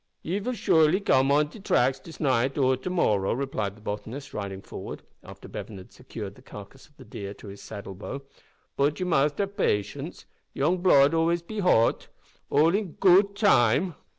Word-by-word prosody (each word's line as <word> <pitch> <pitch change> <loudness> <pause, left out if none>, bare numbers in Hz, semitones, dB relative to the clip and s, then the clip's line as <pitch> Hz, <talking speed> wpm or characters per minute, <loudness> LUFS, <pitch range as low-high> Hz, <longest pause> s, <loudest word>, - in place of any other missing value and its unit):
"Ye 185 +5 -2
vill 250 +5 -3
surely 160 -5 +3
come 135 -9 +3
on 150 +1 +3
de 215 - -12
tracks 130 -8 +1
dis 165 - -13
naight 130 -1 +1
or 130 -2 +3
de 130 +7 -6
morrow," 105 - +1
replied 110 -6 -3
the - - -18
botanist, 110 +7 -6
riding 100 -2 -5
forward, - - -8 0.2
after - - -12
Bevan 105 - -8
had 95 - -13
secured - - -8
the - - -18
carcass - - -12
of - - -32
the - - -13
deer 100 0 -7
to 100 - -11
his 100 +1 -11
saddle 100 -2 -8
bow, 130 +8 -7 0.5
"bot 145 +2 +1
ye 185 - -1
must 145 -4 +1
have 200 0 -2
patience, 105 - -2 0.3
yoong 170 +6 +1
blood 145 -6 +5
be 165 - 0
always 165 +1 +1
too 210 +4 -5
hote. 115 -11 +2 0.4
All 160 +4 +4
in 200 -4 -1
goot 195 +2 +4
time." 175 - +3
140 Hz, 190 wpm, -26 LUFS, 115-180 Hz, 0.5 s, blood